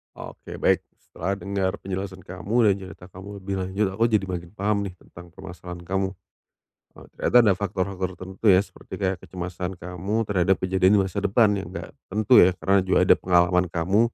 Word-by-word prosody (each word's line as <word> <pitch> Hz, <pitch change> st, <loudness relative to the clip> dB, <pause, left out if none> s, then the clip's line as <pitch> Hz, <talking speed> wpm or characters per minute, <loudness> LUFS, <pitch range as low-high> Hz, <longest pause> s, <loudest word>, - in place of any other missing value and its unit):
Oke -, -, -9 dB
baik -, -, +2 dB, 0.2 s
setelah 100 Hz, +1 st, -4 dB
dengar 100 Hz, -1 st, -1 dB
penjelasan 95 Hz, 0 st, -5 dB
kamu 100 Hz, +6 st, 0 dB
dan 100 Hz, -, +5 dB
cerita 90 Hz, -1 st, -11 dB
kamu 100 Hz, +2 st, -10 dB
lebih 95 Hz, 0 st, -4 dB
lanjut 95 Hz, +2 st, 0 dB
aku 110 Hz, -, +1 dB
jadi 105 Hz, -3 st, +2 dB
makin 90 Hz, -2 st, -5 dB
paham 105 Hz, +1 st, 0 dB
nih 100 Hz, -, -4 dB
tentang 85 Hz, 0 st, -14 dB
permasalahan 90 Hz, 0 st, -9 dB
kamu, 95 Hz, 0 st, -1 dB, 0.8 s
eee, -, -, -14 dB
ternyata 125 Hz, -, 0 dB
ada 105 Hz, -, +5 dB
faktor-faktor 95 Hz, -1 st, -2 dB
tertentu 95 Hz, +4 st, -7 dB
ya 95 Hz, -, +5 dB
seperti -, -, -18 dB
kayak 95 Hz, -2 st, -1 dB
kecemasan 90 Hz, +1 st, -6 dB
kamu 90 Hz, +6 st, -3 dB
terhadap 95 Hz, -2 st, +2 dB
kejadian 95 Hz, +1 st, +3 dB
di 100 Hz, -, +5 dB
masa 95 Hz, +1 st, -4 dB
depan 105 Hz, +2 st, +3 dB
yang 90 Hz, -1 st, -7 dB
gak -, -, -6 dB, 0.2 s
tentu 105 Hz, +1 st, +4 dB
ya 90 Hz, 0 st, +6 dB
karena 95 Hz, +1 st, +2 dB
juga -, -, +3 dB
ada -, -, +6 dB
pengalaman 90 Hz, 0 st, +3 dB
kamu, 90 Hz, +4 st, +1 dB
95 Hz, 185 wpm, -24 LUFS, 90-100 Hz, 0.8 s, ya